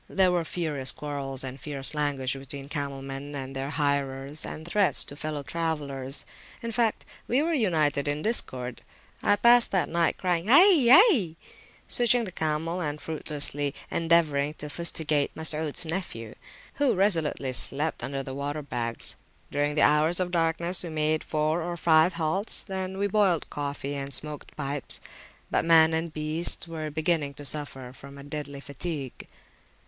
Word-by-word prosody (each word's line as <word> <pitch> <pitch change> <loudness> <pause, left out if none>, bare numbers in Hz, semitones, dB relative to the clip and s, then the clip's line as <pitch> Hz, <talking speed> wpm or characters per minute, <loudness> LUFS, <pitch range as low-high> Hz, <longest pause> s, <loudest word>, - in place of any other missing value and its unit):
There 185 -1 +3
were 175 -1 +1
furious 155 -6 -2
quarrels 140 -3 -4
and 130 0 -7
fierce 145 -1 -5
language 145 -3 -1
between 135 +1 -8
camel 140 -2 -4
men 135 +2 -7
and 135 -1 -6
their 135 +1 -3
hirers, 140 -1 0
and 160 +1 -7
threats 200 +1 +5
to 145 - -8
fellow 150 -1 -4
travellers; 145 -4 -2 0.4
in 230 - -3
fact, 230 -1 0 0.2
we 260 +5 +2
were 335 +1 0
united 155 - +1
in 145 +1 -1
discord. 125 - -2 0.4
I 205 - +3
passed 235 +3 +5
that 190 - +1
night 170 0 +1
crying, 180 -1 -1
Hai! 295 - +6
Hai! 270 - +6 0.5
switching 240 0 +3
the 195 - -6
camel, 160 +2 -2
and 150 -2 -3
fruitlessly 145 -2 -3 0.2
endeavouring 155 -3 +2
to 150 - -8
fustigate 155 -3 +1
Masuds 160 0 +2
nephew, 160 - -5 0.5
who 275 -6 +3
resolutely 165 -9 +1
slept 145 +5 -1
upon 135 0 -3
the 130 - -7
water 145 +2 -4
bags. 120 -4 -3 0.4
During 145 +1 0
the - - +4
hours 155 +4 +3
of 180 -1 -1
darkness 170 +1 0
we 170 - -5
made 155 0 0
four 155 +2 -1
or 175 +1 -4
five 160 +1 +4
halts, 175 +6 -1
when 190 -1 -4
we 200 - 0
boiled 200 -5 +2
coffee 145 -1 -4
and 140 0 -4
smoked 150 +1 -6
pipes; 140 -2 -1 0.5
but - - +2
man 165 -1 +6
and 160 0 -2
beasts 155 +3 +3
were 160 -2 -5
beginning 155 -2 0
to 145 - -9
suffer 135 -4 -1
from 140 +1 -13
a 140 - -10
deadly 145 -1 -6
fatigue. 140 -1 -6
155 Hz, 160 wpm, -27 LUFS, 140-170 Hz, 0.5 s, Hai